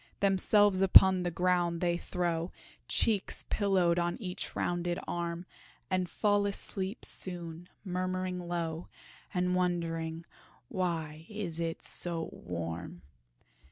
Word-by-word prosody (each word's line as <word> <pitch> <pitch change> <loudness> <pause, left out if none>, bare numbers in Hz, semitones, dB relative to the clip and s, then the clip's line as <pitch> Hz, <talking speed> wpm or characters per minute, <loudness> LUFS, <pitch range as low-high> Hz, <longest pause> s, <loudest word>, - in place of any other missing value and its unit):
Themselves 200 0 +4
upon 190 -1 +8
the 175 - 0
ground 175 -1 +1
they 175 -1 +2
throw, 175 -1 -1 0.4
Cheeks 210 -4 +1
pillowed 185 -4 +3
on 175 0 0
each 180 -4 -5
rounded 175 0 0
arm 170 0 -3 0.5
And 185 -1 +1
fall 205 -1 +2
asleep 195 +1 -3
soon, 175 -1 -6 0.2
murmuring 185 0 -2
low, 170 -1 -2 0.4
And 180 -1 +1
wondering 165 -2 -1 0.4
"why 165 -3 -2
it 210 -5 -3
is 165 -1 -1
so 170 -2 0
warm?" 85 0 -5
175 Hz, 110 wpm, -31 LUFS, 170-185 Hz, 0.5 s, upon